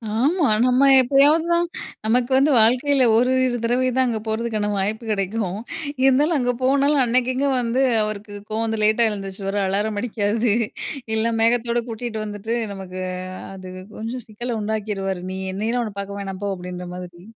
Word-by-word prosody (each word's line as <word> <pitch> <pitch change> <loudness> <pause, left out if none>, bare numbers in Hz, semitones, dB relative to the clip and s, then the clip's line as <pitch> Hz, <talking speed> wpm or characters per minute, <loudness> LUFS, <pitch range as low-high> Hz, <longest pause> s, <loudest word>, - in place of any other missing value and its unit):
ஆமா, 295 +6 +2 0.2
நம்ப 255 +2 +3 0.2
எப்பயாவது 285 +5 +4
தான் 340 0 +2 0.4
நமக்கு 245 +3 +1
வந்து 285 +2 +4
வாழ்க்கையில 255 +4 +4
ஒரு 250 +2 +3 0.3
தடவை 250 +2 +1
தான் 260 0 +3
அங்கே 225 -2 -1
போகிறதுக்கான 220 -1 -1
வாய்ப்பு 210 +4 -1
கிடைக்கும். 195 -1 -2 0.5
இருந்தாலும் 290 +4 +4
அங்க 245 -1 +1
போனாலும், 280 +1 +3
அன்னைக்கு 250 +2 +2
இங்கே 280 +1 +1
வந்து, 240 +3 0 0.2
அவருக்கு 210 0 -5 0.2
கோவம் 225 +1 -1
வந்து 220 -1 -2
லேட்டா 220 +2 +4
எழுந்துருச்சுருவாரு 195 0 -4
அலாரம் 205 +2 -1
அடிக்காது, 220 -1 0 0.6
இல்ல 230 +1 +1
மேகத்தோடு 235 +1 +2
கூட்டிட்டு 220 -1 -4
வந்துவிட்டு 210 +3 -4 0.2
நமக்கு, 185 -1 -7 0.4
அ - - -9
அது 185 -1 -9 0.3
கொஞ்சம் 230 +2 -5
சிக்கலை 235 +2 -4
உண்டாக்கிருவாரு, 200 -3 -3
நீ - - -5 0.2
என்னையெல்லாம் 230 +5 -1
உன்னை 205 -2 -7
பார்க்க 200 0 -5
வேணாம் 195 0 -6
போ - - -1
அப்படின்ற 180 0 -7
மாதிரி. 175 -1 -9
225 Hz, 155 wpm, -22 LUFS, 205-250 Hz, 0.6 s, எப்பயாவது